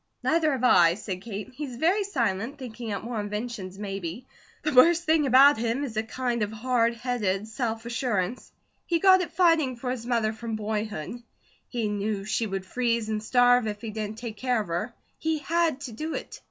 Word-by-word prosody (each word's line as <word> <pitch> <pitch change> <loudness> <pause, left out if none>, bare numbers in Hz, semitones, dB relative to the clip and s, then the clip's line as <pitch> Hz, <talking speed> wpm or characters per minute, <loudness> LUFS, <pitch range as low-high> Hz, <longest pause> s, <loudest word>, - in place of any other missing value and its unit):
"Neither 320 -2 +2
have 255 -2 -3
I," 175 -8 +6
said 185 -2 -5
Kate. 210 -2 -6
"He's 275 -2 -6
very 355 - +2
silent, 240 - -1
thinking 240 -3 -7
out 200 - -3
more 235 -1 -3
inventions, 205 -2 -5
maybe. 195 +2 -5 0.4
The 305 - 0
worst 330 +7 +6
thing 315 -3 +3
about 270 +1 +7
him 235 +4 -1
is 245 -6 -5
a 220 - +1
kind 240 +1 -2
of 210 0 -1
hard 235 +1 +1
headed 220 -5 -1
self 225 0 -3
assurance. 235 -3 -2 0.4
He 340 - +2
got 375 +1 +6
it 355 - -4
fighting 330 -7 +3
for 250 +1 -4
his 240 -2 -5
mother 230 -3 +1
from 225 0 -5
boyhood. 215 -1 -4 0.5
He 235 -3 -1
knew 205 0 -2
she 220 +2 0
would 195 -1 -4
freeze 235 0 -1
and 215 -1 -1
starve 245 +1 +4
if 210 -1 -4
he 225 -2 -5
didn't 215 0 -4
take 225 -2 -6
care 250 -1 +1
of 205 - -8
her; 175 +8 -2 0.3
he 320 0 0
HAD 320 -1 0
to 270 -4 -6
do 310 +8 -4
it. - - -7
235 Hz, 195 wpm, -26 LUFS, 215-260 Hz, 0.5 s, about